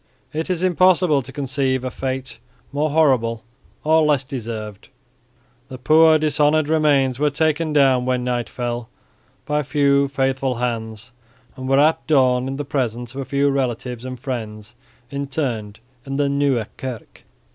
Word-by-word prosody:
It 160 Hz, +4 st, -3 dB
is 180 Hz, -1 st, -1 dB
impossible 180 Hz, -4 st, +3 dB
to 130 Hz, +1 st, -11 dB
conceive 135 Hz, -1 st, -1 dB
a 130 Hz, -, -3 dB
fate 130 Hz, -3 st, -5 dB, 0.3 s
more 150 Hz, +2 st, 0 dB
horrible 130 Hz, -7 st, +2 dB, 0.4 s
or 160 Hz, +1 st, +4 dB
less 150 Hz, -3 st, +2 dB
deserved. 110 Hz, -5 st, -7 dB, 0.8 s
The 130 Hz, -, -7 dB
poor 155 Hz, +4 st, +5 dB
dishonoured 150 Hz, 0 st, +2 dB
remains 140 Hz, -5 st, +2 dB
were 150 Hz, 0 st, +3 dB
taken 155 Hz, +2 st, 0 dB
down 135 Hz, -4 st, +3 dB
when 125 Hz, -1 st, 0 dB
night 120 Hz, -1 st, -2 dB
fell 120 Hz, -1 st, -4 dB, 0.6 s
by 150 Hz, 0 st, 0 dB
faithful 140 Hz, -2 st, +1 dB
hands 115 Hz, -1 st, -4 dB, 0.4 s
and 130 Hz, 0 st, -6 dB
were 135 Hz, -, +4 dB
at 155 Hz, +3 st, +3 dB
dawn 130 Hz, -4 st, +3 dB
in 135 Hz, -, -3 dB
the 145 Hz, +1 st, -4 dB
presence 120 Hz, -3 st, -3 dB
of 135 Hz, -, -5 dB
a -, -, -5 dB
few 140 Hz, +1 st, +1 dB
relatives 125 Hz, -2 st, -2 dB
and 130 Hz, -1 st, -6 dB
friends 110 Hz, -4 st, -6 dB, 0.4 s
interred 135 Hz, -7 st, -3 dB, 0.3 s
in 135 Hz, +1 st, -5 dB
the 145 Hz, 0 st, +1 dB
Nieuwe 140 Hz, -5 st, +1 dB
Kerk. 125 Hz, -4 st, -8 dB
135 Hz, 145 wpm, -21 LUFS, 125-145 Hz, 0.8 s, poor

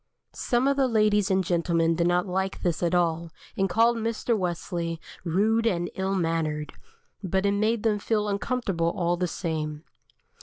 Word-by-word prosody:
Some 245 Hz, +2 st, 0 dB
of 280 Hz, 0 st, +2 dB
the 270 Hz, -1 st, +3 dB
ladies 210 Hz, -3 st, +2 dB
and 190 Hz, 0 st, +2 dB
gentlemen 170 Hz, -2 st, +1 dB
did 170 Hz, +1 st, +1 dB
not 175 Hz, +1 st, +2 dB
like 190 Hz, +1 st, -2 dB
this 175 Hz, -3 st, 0 dB
at 175 Hz, 0 st, +1 dB
all, 170 Hz, -1 st, +1 dB, 0.3 s
and 195 Hz, 0 st, +1 dB
called 230 Hz, +4 st, +3 dB
Mr. 230 Hz, +1 st, -1 dB
Wesley 170 Hz, -3 st, -3 dB, 0.2 s
"rude 215 Hz, +7 st, +2 dB
and 175 Hz, -4 st, -1 dB
ill 190 Hz, +1 st, -1 dB
mannered," 160 Hz, -4 st, -1 dB, 0.5 s
but 190 Hz, 0 st, 0 dB
it 200 Hz, -, +3 dB
made 215 Hz, +2 st, +1 dB
them 215 Hz, -2 st, +2 dB
feel 210 Hz, 0 st, 0 dB
uncomfortable 200 Hz, -5 st, -1 dB
all 175 Hz, -1 st, +1 dB
the 180 Hz, +1 st, -1 dB
same. 155 Hz, -3 st, -4 dB
185 Hz, 165 wpm, -26 LUFS, 170-215 Hz, 0.5 s, the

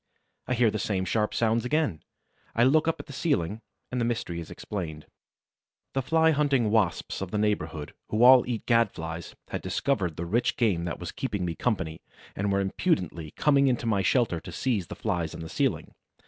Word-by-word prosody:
I 125 Hz, -, +1 dB
hear 115 Hz, -2 st, +3 dB
the 110 Hz, -, -2 dB
same 95 Hz, -3 st, -1 dB
sharp 105 Hz, +2 st, 0 dB
sounds 115 Hz, 0 st, +1 dB
again. 125 Hz, -, 0 dB, 0.5 s
I 115 Hz, -, +4 dB
look 155 Hz, +5 st, +4 dB
up 165 Hz, -, 0 dB
at -, -, -7 dB
the 140 Hz, -, -10 dB
ceiling 115 Hz, -, 0 dB, 0.3 s
and 125 Hz, -1 st, -1 dB
the -, -, +2 dB
mystery 110 Hz, -7 st, -2 dB
is 85 Hz, -, -8 dB
explained. 80 Hz, -7 st, -6 dB, 0.9 s
The 135 Hz, -, +1 dB
Fly 160 Hz, +5 st, +3 dB
hunting 140 Hz, -7 st, +2 dB
Wasps 105 Hz, -6 st, 0 dB
of 95 Hz, -, -3 dB
the 105 Hz, -, -2 dB
neighborhood, 80 Hz, -8 st, -1 dB, 0.2 s
who 110 Hz, +3 st, +2 dB
all 130 Hz, 0 st, +9 dB
eat 115 Hz, -3 st, -3 dB
Gad 115 Hz, -1 st, +4 dB
flies, 80 Hz, +1 st, -7 dB
had -, -, -3 dB
discovered 100 Hz, -, -1 dB
the 85 Hz, -, -3 dB
rich 120 Hz, +8 st, 0 dB
game 95 Hz, -8 st, +1 dB
that 85 Hz, -, -3 dB
was 85 Hz, -, -5 dB
keeping 105 Hz, -8 st, -3 dB
me 85 Hz, -, -2 dB
company 80 Hz, -8 st, -2 dB, 0.3 s
and 100 Hz, +1 st, -1 dB
were 100 Hz, 0 st, +2 dB
impudently 95 Hz, -, -1 dB
coming 140 Hz, -2 st, +4 dB
into 125 Hz, -2 st, 0 dB
my 105 Hz, -4 st, +2 dB
shelter 100 Hz, -3 st, +2 dB
to -, -, -9 dB
seize 110 Hz, -10 st, -1 dB
the -, -, -7 dB
Flies 85 Hz, -3 st, -2 dB
on -, -, -7 dB
the 80 Hz, -, -6 dB
ceiling. -, -, -1 dB
105 Hz, 200 wpm, -27 LUFS, 85-125 Hz, 0.9 s, all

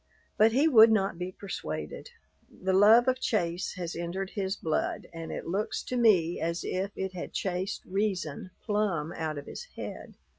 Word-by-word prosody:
But 220 Hz, +1 st, +5 dB
he 275 Hz, +7 st, +4 dB
would 225 Hz, -6 st, +8 dB
not 195 Hz, -5 st, +1 dB
be 180 Hz, +1 st, -3 dB
persuaded. 80 Hz, -, -6 dB, 0.4 s
The 190 Hz, 0 st, -2 dB
love 220 Hz, +6 st, +7 dB
of 255 Hz, 0 st, +2 dB
chase 175 Hz, -7 st, -1 dB
has 175 Hz, -2 st, -5 dB
entered 180 Hz, +3 st, -4 dB
his 195 Hz, -1 st, -2 dB
blood, 160 Hz, -5 st, -2 dB
and 165 Hz, -1 st, -6 dB
it -, -, -5 dB
looks 195 Hz, +5 st, -2 dB
to 255 Hz, -, -4 dB
me 190 Hz, -9 st, +4 dB
as 170 Hz, +1 st, -1 dB
if 190 Hz, +2 st, -2 dB
it 190 Hz, -1 st, -3 dB
had 180 Hz, -, -6 dB
chased 185 Hz, +1 st, -2 dB
reason 185 Hz, -5 st, -2 dB
plumb 195 Hz, -7 st, 0 dB
out 155 Hz, -2 st, -3 dB
of 145 Hz, -, -6 dB
his -, -, -8 dB
head. -, -, -7 dB
190 Hz, 175 wpm, -29 LUFS, 170-210 Hz, 0.4 s, would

